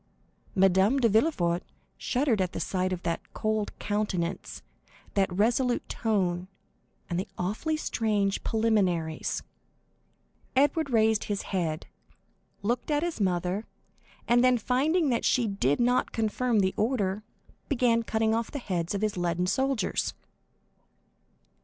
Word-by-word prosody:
Madame 195 +6 +4
de 240 - +4
Villefort 195 - +2 0.3
shuddered 250 -5 +1
at 180 -1 -1
the - - -3
sight 185 -1 -1
of 180 -1 -3
that 170 -1 -1
cold 215 -1 -1
countenance, 205 -5 -2 0.5
that 195 -2 +2
resolute 240 +6 +1
tone, 185 -5 0 0.6
and 175 -1 -2
the 190 - -3
awfully 215 - -1
strange 210 -8 0
preliminaries. 190 -8 0 1.1
Edward 290 +3 +3
raised 220 -2 +3
his 205 -1 -2
head, 165 -4 -1 0.8
looked 240 +6 -1
at 295 +1 +1
his 345 -9 -3
mother, 185 +2 0 0.6
and 240 +1 +4
then, 255 -1 +5
finding 285 - +1
that 235 -2 0
she 245 - +3
did 170 -9 +1
not 245 +1 +2
confirm 225 0 +1
the 190 0 +1
order, 210 -4 0 0.5
began 240 -4 +3
cutting 220 -1 0
off 230 0 -1
the - - -5
heads 180 -7 -2
of 200 - -2
his 210 -3 0
leaden 175 0 0
soldiers. 260 +2 0
215 Hz, 130 wpm, -28 LUFS, 185-245 Hz, 1.1 s, then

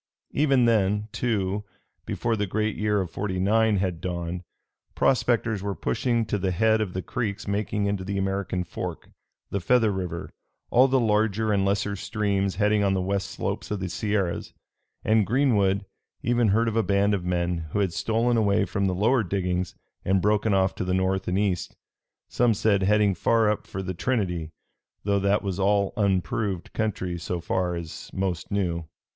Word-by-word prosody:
Even 135 -4 +3
then, 105 -2 +2
too, 105 -4 -1 0.4
before 115 -1 0
the 105 -1 -1
great 105 +2 -1
year 105 -1 +1
of 90 - -5
'49 105 +3 +1
had 90 -3 -1
dawned, 85 -1 -3 0.5
prospectors 115 -5 +2
were 100 0 -3
pushing 115 -1 0
to 105 - -1
the 95 0 0
head 110 +4 +3
of 95 -4 -2
the 95 - -3
creeks 105 -4 -3
making 100 0 -1
into 100 -1 -1
the 100 +1 -3
American 95 -1 -1
Fork, 90 - -6 0.4
the 100 - 0
Feather 115 +2 +3
River, 90 -3 -4 0.4
all 130 +3 +6
the 135 0 +3
larger 110 -1 +2
and 100 -1 +2
lesser 100 +1 0
streams 100 -1 -1
heading 105 +1 +2
on 95 -1 +2
the - - +1
west 95 +1 -1
slopes - - -4
of 105 - -2
the 95 -1 -3
Sierras; 100 -1 -2 0.5
and 110 -2 +3
Greenwood 105 -7 +2 0.4
even 120 -1 +2
heard 115 +4 +3
of 110 - -1
a 115 - +4
band 100 0 +2
of 95 -3 -1
men 85 -2 -1
who 75 - -3
had 95 -4 +1
stolen 115 +5 +1
away 100 -3 +3
from 100 0 -1
the 90 - 0
lower 115 +6 +3
diggings 90 -2 -2 0.3
and 95 +1 +2
broken 105 +2 +2
off 95 -1 +2
to - - -4
the 90 0 0
north 95 0 0
and 90 - 0
east 100 -3 -1 0.5
some 120 -2 +2
said, 100 -1 +2
heading 105 +1 +3
far 110 +4 +3
up 105 - -4
for 95 - -5
the 95 0 -3
Trinity, 90 -5 -1 0.5
though 100 0 +2
that 100 +2 +2
was 95 -1 -3
all 100 0 +2
unproved 100 -2 -1
country 95 -5 -2
so 85 +1 -3
far 90 +1 -1
as 85 -2 -7
most 95 -2 -2
knew. 85 -5 -1
100 Hz, 175 wpm, -26 LUFS, 95-110 Hz, 0.5 s, all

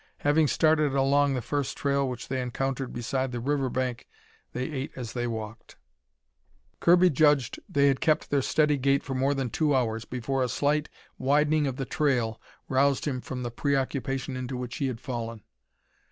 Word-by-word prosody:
Having 150 +2 +3
started 155 -2 +2
along 140 +1 +3
the 125 - -3
first 145 +2 -2
trail 140 -1 +1
which 125 -1 -6
they 130 -1 -2
encountered 130 +1 -2
beside 130 +2 -2
the 120 - -3
river 135 +1 0
bank, 125 -1 -3 0.4
they 125 - -3
ate 135 -1 -4
as 120 -4 -6
they 120 -1 -2
walked. 110 -1 -6 1.0
Kirby 180 +1 +5
judged 145 -3 +3
they 140 0 +3
had 135 -1 +1
kept 155 0 +1
their 140 -1 +3
steady 150 +2 +2
gait 140 +1 +2
for 135 - -4
more 135 +2 +1
than 130 -4 -2
two 150 -3 +2
hours 115 -3 0
before 130 +2 -2
a 125 - +1
slight 150 +3 0 0.3
widening 150 +2 +2
of 130 - -2
the 135 - -3
trail 125 -7 0 0.3
roused 140 +1 +2
him 130 -4 -2
from 125 -1 -5
the 120 - -3
preoccupation 135 0 -1
into 130 0 -4
which 125 -1 -5
he 140 -4 0
had 125 -3 -4
fallen. 115 -5 -5
135 Hz, 180 wpm, -27 LUFS, 125-145 Hz, 1.0 s, Kirby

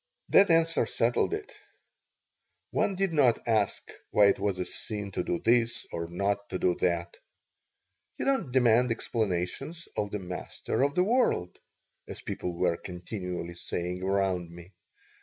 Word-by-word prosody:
This 200 - +6
answer 165 -6 +3
settled 120 - +1
it. 415 0 -8 1.2
One 195 - +1
did 195 -2 0
not 125 -8 +3
ask 110 -3 +1 0.2
why 100 -1 +6
it - - +1
was 100 -3 0
a 90 - -2
sin 105 +2 -5
to - - -1
do 90 - -1
this 115 +3 +2
or 85 0 -3
not 100 +3 -1
to - - -2
do 90 - +2
that. 85 -1 0 1.0
"You - - -3
don't 270 - +1
demand 125 -1 +4
explanations 115 - -2
of 105 -1 -1
the 105 - -3
Master 90 +5 -4
of 140 +1 +2
the 180 - +4
World," 215 - +1 0.5
as - - -8
people 90 - -4
were 85 0 +1
continually 90 -1 -6
saying 90 +1 -4
around 95 -2 0
me. 85 +2 -12
100 Hz, 150 wpm, -29 LUFS, 90-125 Hz, 1.2 s, This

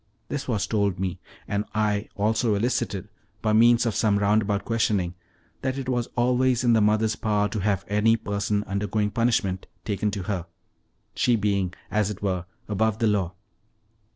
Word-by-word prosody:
This 145 -1 -3
was 110 -5 0
told 100 -3 0
me, 95 -2 -2 0.3
and 100 0 0
I 105 -1 0
also 110 +1 +1
elicited, 105 -3 -1 0.4
by 110 -1 +2
means 115 +2 +5
of 115 - +1
some 105 -1 +2
roundabout 100 0 +1
questioning, 105 -6 +1 0.5
that 130 0 -1
it 135 -2 -4
was 125 -2 0
always 125 +1 +2
in 120 -1 +4
the 110 - +4
mother's 110 +1 +2
power 105 -1 +1
to 105 - -3
have 100 -2 0
any 105 +3 +3
per 100 -2 -3
son 105 0 0
undergoing 105 +1 -1
punishment 110 -6 0 0.2
taken 105 0 0
to 100 -2 -4
her, 90 -3 -3 0.7
she 120 - +2
being, 100 -4 0 0.2
as 105 -1 +1
it 105 -1 -6
were, 90 -3 -1 0.2
above 110 +1 +1
the 115 - +1
law. 100 -4 +1
105 Hz, 170 wpm, -25 LUFS, 100-115 Hz, 0.7 s, means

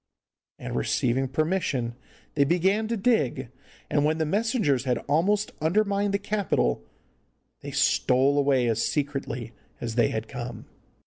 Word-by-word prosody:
And - - -6
receiving 125 - 0
permission 140 -4 -1 0.4
they 140 - +3
began 190 +8 +2
to 230 +1 -1
dig, 195 - +1 0.4
and 145 - +1
when 155 +1 +2
the 160 - 0
messengers 195 - +1
had 125 -2 +1
almost 200 +8 +1
undermined 200 +4 +1
the 200 - +2
Capitol 200 - 0 0.8
they - - -8
stole 135 +3 +2
away 135 -3 +3
as 115 -1 +1
secretly 135 -5 -3 0.3
as 115 -1 -4
they 120 0 +3
had 110 0 -3
come. 120 -3 -7
145 Hz, 135 wpm, -26 LUFS, 125-195 Hz, 0.8 s, they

